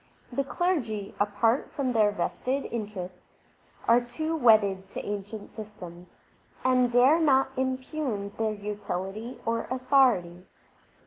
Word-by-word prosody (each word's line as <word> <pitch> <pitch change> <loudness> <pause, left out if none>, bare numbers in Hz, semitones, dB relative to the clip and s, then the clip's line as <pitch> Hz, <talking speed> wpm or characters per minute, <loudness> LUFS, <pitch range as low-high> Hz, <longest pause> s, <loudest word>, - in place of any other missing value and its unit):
The 275 +3 0
clergy, 260 - -1
apart 225 +5 +1
from 260 -3 -1
their 215 -2 +4
vested 255 +6 -2
interests, 195 -5 -7 0.3
are 235 +1 +6
too 310 +7 -3
wedded 205 -8 +4
to - - -7
ancient 205 +1 -5
systems, 180 -5 -10 0.5
and 255 -1 +3
dare 255 +7 +5
not 270 -4 +3
impugn 260 -5 -2
their 220 -1 +1
utility 205 +2 -5
or 230 0 -1
authority. 250 -9 +2
230 Hz, 115 wpm, -27 LUFS, 205-260 Hz, 0.5 s, are